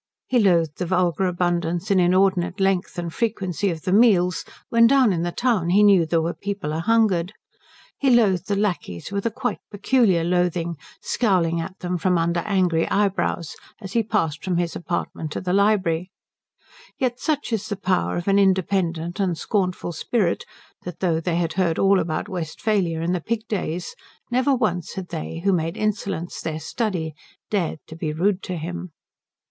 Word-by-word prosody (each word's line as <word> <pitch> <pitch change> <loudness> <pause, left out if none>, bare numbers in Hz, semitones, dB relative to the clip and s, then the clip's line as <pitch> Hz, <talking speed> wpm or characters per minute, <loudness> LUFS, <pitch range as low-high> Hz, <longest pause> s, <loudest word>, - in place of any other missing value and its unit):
He 250 - +2
loathed 170 -7 +2
the 180 - -2
vulgar 180 0 +1
abundance 175 +1 -1
and 190 -2 +4
inordinate 185 +1 +2
length 190 -1 0
and 170 -1 -4
frequency 200 -4 -1
of 165 -3 -4
the 185 - -1
meals, 195 -5 +4 0.3
when 230 0 +6
down 255 -5 +4
in 165 - -1
the 175 0 -1
town 220 -6 0
he 200 +4 +5
knew 195 -5 +5
there 165 0 +1
were 170 +1 -1
people 200 -6 -4
a 160 - -1
hungered. 195 -2 +2 0.7
He 275 - +2
loathed 205 -7 +3
the 205 - 0
lacqueys 185 - -2
with 200 +2 -1
a - - +2
quite 245 +3 -3
peculiar 205 -4 +2
loathing, 175 -1 0 0.3
scowling 175 -7 +1
at 185 +3 -7
them 180 -1 -2
from 180 +1 +2
under 170 +1 +1
angry 180 -5 +1
eyebrows 195 -5 0 0.2
as 195 -2 -8
he 235 - +3
passed 165 -9 -1
from 180 -2 0
his 170 -1 -1
apartment 170 -2 -4
to - - -3
the 180 -1 -2
library; 190 -4 +2 0.9
yet 250 -1 -1
such 295 -6 -1
is 210 -2 -1
the 205 - -1
power 185 -3 0
of 175 - -4
an 200 0 +4
independent 185 -2 +1
and 180 -4 0
scornful 185 -3 -1
spirit 175 +2 -1 0.4
that 180 - -8
though 170 -4 +1
they 170 0 -1
had 170 -1 0
heard 175 -3 +1
all 195 0 +4
about 160 +3 -2
Westphalia 175 -1 -1
and 175 +2 0
the 180 - -1
pig 225 +4 -3
days 180 -5 -3 0.4
never 260 +3 +3
once 180 -9 -1
had 185 -2 -6
they, 165 0 -5
who 195 0 +3
made 165 -1 -1
insolence 200 -5 -2
their 155 -1 -3
study, 165 -2 -2 0.4
dared 190 -7 0 0.2
be 155 -2 -2
rude 185 +5 +1
to 180 - -4
him. 175 +1 -6
185 Hz, 175 wpm, -23 LUFS, 170-205 Hz, 0.9 s, when